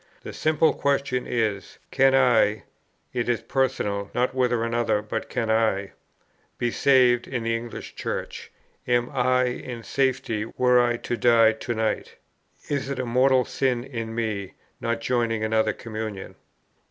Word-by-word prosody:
The - - -7
simple 155 0 +2
question 140 -2 -1
is, 110 -5 -2
Can 135 0 +4
I 120 -5 +3 0.5
(it 120 -1 -1
is 120 - 0
personal, 105 -7 -1
not 125 +1 +1
whether 125 -3 +1
another, 115 -2 +1
but 105 - -4
can 115 -3 -1
I) 110 -3 +1 0.7
be 120 -1 -1
saved 125 -3 +3
in 125 -3 -3
the 115 0 0
English 115 0 -7
Church? - - -5 0.4
am 120 0 +1
I 130 0 +2
in 125 -1 -4
safety, 130 -3 -1
were 125 -1 +5
I 120 -1 +1
to 120 - -4
die 115 -1 +5
to 120 +2 -4
night? 110 0 -2 0.5
Is 140 -2 -2
it 140 - -3
a 130 - -2
mortal 130 +1 +3
sin 125 -3 -1
in 115 -4 -6
me, 105 -4 -3 0.2
not 115 0 -2
joining 115 -3 0
another 110 0 +2
communion? 110 -2 -6
120 Hz, 150 wpm, -25 LUFS, 110-130 Hz, 0.7 s, were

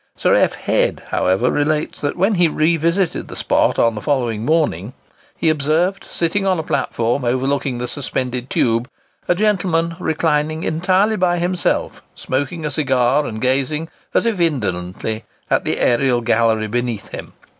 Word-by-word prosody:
Sir - - +2
F. - - +3
Head, - - 0
however 95 +7 +1
relates, 150 +1 -1
that 145 - -2
when 195 +5 +2
he 175 -3 +4
revisited 165 +3 +1
the - - -9
spot - - +1
on 115 -1 +3
the 105 - -6
following 120 -6 -1
morning, 130 - 0 0.4
he - - -1
observed, 155 +5 +1
sitting 175 +4 0
on 190 -2 +2
a 160 - -2
platform 120 -2 -1
overlooking 130 +1 0
the 125 +1 -3
suspended 125 -2 -3
tube, 115 +2 +1 0.4
a 175 - +3
gentleman, 180 -5 +1
reclining 155 -1 0
entirely 185 +6 +1
by 175 -1 +2
himself, 175 +1 -1
smoking 145 +5 -3
a 150 - -2
cigar, 135 0 +2
and 110 -1 -6
gazing, 140 +5 0 0.2
as - - +1
if 225 -5 0
indolently, 110 - -1 0.3
at - - +2
the - - +1
aërial 120 -1 +2
gallery 115 -1 +2
beneath 120 -1 -3
him. - - -8
145 Hz, 155 wpm, -19 LUFS, 120-170 Hz, 0.4 s, he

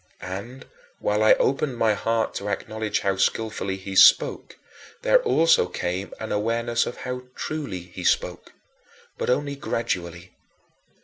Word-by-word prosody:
And, 100 +8 -7 0.3
while 105 +1 0
I 110 - +7
opened 135 -1 0
my 110 -2 +3
heart 115 +2 -1
to 100 - -4
acknowledge 110 0 -2
how 100 -1 0
skillfully 100 -1 -1
he 95 0 -7
spoke, - - +5 0.5
there - - +5
also 165 - +3
came 90 +2 -4
an 110 - -5
awareness 115 +2 0
of - - -6
how 125 0 -4
truly 140 - -4
he 90 +1 -10
spoke - - 0 0.7
but - - -2
only 140 +2 0
gradually. 90 -9 -4
110 Hz, 135 wpm, -24 LUFS, 95-125 Hz, 0.7 s, I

